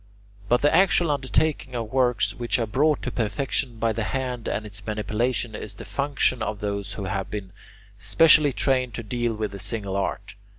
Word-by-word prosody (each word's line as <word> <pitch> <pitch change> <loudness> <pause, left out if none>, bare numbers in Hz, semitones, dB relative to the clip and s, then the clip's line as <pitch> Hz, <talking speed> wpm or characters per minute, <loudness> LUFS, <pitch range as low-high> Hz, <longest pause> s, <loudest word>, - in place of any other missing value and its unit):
But 120 +2 +3
the 145 - +4
actual 175 -3 +4
undertaking 140 -1 0
of 115 0 -4
works 125 -5 +2
which 120 -1 -1
are 115 - 0
brought 145 +7 +1
to 125 - -2
perfection 120 +2 -1
by 115 0 +1
the 110 0 -2
hand 125 -3 -3
and 110 - -2
its 105 0 -7
manipulation 110 +2 -1
is 105 0 -6
the - - -9
function 140 -3 0
of 110 -1 -2
those 100 -1 -3
who 100 - -5
have 95 0 -3
been 100 -3 -6 0.5
specially 155 -3 +5
trained 130 -1 +1
to 115 - -5
deal 120 +1 -1
with 105 -2 -3
a 100 - -7
single 100 -1 -3
art. 100 - -3
115 Hz, 185 wpm, -25 LUFS, 105-130 Hz, 0.5 s, specially